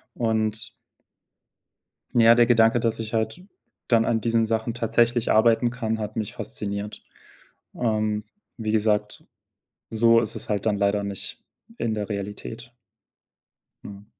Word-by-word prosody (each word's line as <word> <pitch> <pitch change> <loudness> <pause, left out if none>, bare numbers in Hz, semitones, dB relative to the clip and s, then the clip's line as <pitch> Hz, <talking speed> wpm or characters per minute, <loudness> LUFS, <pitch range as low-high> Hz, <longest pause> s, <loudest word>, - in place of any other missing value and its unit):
und 110 -1 -1 1.5
ja 115 +1 +7
der 120 0 +5
Gedanke, 115 0 +4
dass 115 -1 -1
ich 110 0 -6
halt 115 +11 -2 0.4
dann 115 -2 +3
an 115 -2 +1
diesen 115 0 +2
Sachen 110 +1 -1
tatsächlich 120 0 +1
arbeiten 115 +2 +4
kann, 115 -3 -2
hat 105 -1 -5
mich 110 -2 -3
fasziniert. 100 +1 -5 0.7
Ähm, 110 -2 0 0.3
wie 110 -3 -2
gesagt, 105 -1 0 0.7
so 115 +1 +4
ist - - -4
es - - -6
halt 105 -1 -1
dann 105 -1 +1
leider 100 +1 +1
nicht 100 -1 -6 0.3
in 115 - -1
der 105 -1 -4
Realität. 105 +3 -6 1.1
Mhm. 100 0 -10
110 Hz, 130 wpm, -24 LUFS, 105-115 Hz, 1.5 s, ja